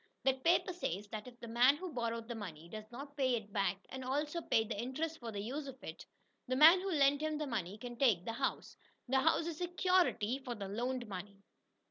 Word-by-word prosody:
That 265 -1 +1
paper 350 +2 +3
says 205 - -3
that 215 +2 -6
if 245 -1 -12
the 235 - -8
man 245 +5 +5
who 365 0 -6
borrowed 230 -2 -2
the 240 - -4
money 170 -8 -7
does 215 +3 -8
not 280 +4 -8
pay 260 -4 +2
it 210 -3 -6
back, 195 0 0
and 260 0 -6
also 295 +6 -1
pay 225 - +2
interest 260 +9 -3
for 235 -2 -6
the 205 - -4
use 280 +6 -4
of 265 -1 -8
it, - - -8 0.4
the 255 - 0
man 325 +6 +8
who 390 - -2
lent 285 -3 +4
him 310 -1 -1
the 300 - -2
money 210 -7 -3
can 240 +1 -7
take 220 -10 +3
the 230 - -2
house. 265 +3 -2 0.3
The 265 +2 +3
house 320 +3 +3
is 335 -2 -4
"security" 355 - +2
for 250 -3 -5
the 200 -3 -5
loaned 245 +4 -2
money. 200 0 -8
250 Hz, 220 wpm, -35 LUFS, 215-295 Hz, 0.4 s, man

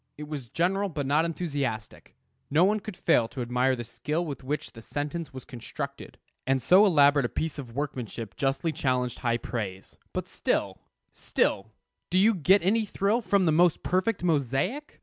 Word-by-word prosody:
It 150 0 -7
was 140 -6 -6
general, 195 - 0
but 145 -4 -3
not 150 +4 +3
enthusiastic. 145 -10 -4 0.3
No 155 +5 +4
one 210 +2 +2
could 210 -2 -8
fail 115 -9 +3
to 130 - -6
admire 125 +2 +1
the 120 - -5
skill 150 +8 -3
with 145 -4 -6
which 145 +3 -3
the 115 - -12
sentence 145 +5 -4
was 130 -2 -9
constructed; 120 -3 -7 0.3
and 135 0 +3
so 185 - +6
elaborate 145 -5 +5
a - - -1
piece 160 -2 -3
of 120 -4 -8
workmanship 120 -7 -4
justly 135 +4 0
challenged 125 -4 -1
high 120 -2 +1
praise. 100 -6 -5
But - - -4
still - - -1 0.3
still, 100 - 0 0.4
do 180 - +1
you 215 +4 +5
get 190 +2 +4
any 220 +5 +3
thrill 205 +3 0
from 200 -4 +2
the 160 - +4
most 170 +1 +3
perfect 185 +2 0
mosaic? 165 - -1
145 Hz, 175 wpm, -27 LUFS, 125-180 Hz, 0.4 s, so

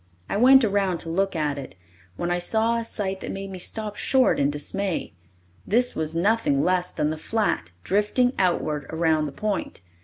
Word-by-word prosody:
I - - -3
went 260 +4 +7
around 200 -4 +1
to 165 - -6
look 195 +3 0
at 150 -3 -1
it, 135 - -9 0.4
when 175 - -2
I 175 - +1
saw 225 +5 +1
a - - -3
sight 195 -4 -3
that - - -6
made 195 0 -6
me 185 - -7
stop 210 +3 -3
short 260 +4 +2
in 140 - +3
dismay. 180 +6 -3 0.5
This 245 +4 +2
was 160 0 -3
nothing 175 -6 +2
less 180 0 +1
than 150 - -1
the 155 - -4
flat, 210 - -1
drifting 210 +6 +2
outward 155 -5 0
around 160 -1 +1
the - - -6
point. 205 - -3
190 Hz, 185 wpm, -24 LUFS, 160-215 Hz, 0.5 s, went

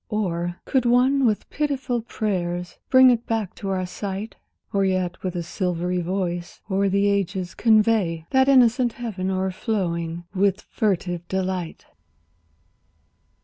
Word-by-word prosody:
Or, 175 -5 -2
could 265 -3 +1
one 255 +2 +4
with 215 -2 -1
pityful 270 -5 -1
prayers 180 -4 -3
bring 260 -1 +7
it 235 -1 -1
back 225 -5 -1
to 195 - -4
our 185 -1 -1
sight? 200 +3 -5 0.4
Or 200 -1 +2
yet 185 -2 -1
with 185 -2 -3
a 175 - -2
silvery 180 0 -2
voice 175 -1 -3
o'er 195 +1 +2
the 200 +1 +2
ages 190 -2 -1
convey 215 -7 +2
That 265 +1 +4
innocent 245 -2 +4
heaven 205 -6 -4
o'erflowing 185 -3 -2
with 200 0 +1
furtive 180 -4 -2
delight! 185 -3 -3
195 Hz, 130 wpm, -23 LUFS, 180-225 Hz, 0.4 s, bring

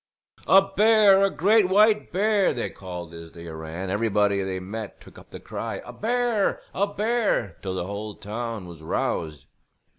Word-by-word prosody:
"A 195 0 +7
bear, 200 0 +5
a 195 - +4
great 200 +2 +3
white 210 +2 +4
bear!" 200 -2 +2
they 120 - -3
called 90 -3 -8
as 85 0 -11
they 85 0 -11
ran; 80 +1 -7
and 95 -1 -3
everybody 105 -1 +1
they 95 -1 -3
met 105 +3 -7
took - - -15
up - - -18
the - - -9
cry: - - -5
"A - - -9
bear, 235 -2 0
a 200 +2 +1
bear!" 210 - -1
till 95 -1 -4
the 90 - -3
whole 100 +2 -6
town 110 0 -5
was 85 -3 -11
roused. 80 -2 -3
110 Hz, 175 wpm, -25 LUFS, -, -, A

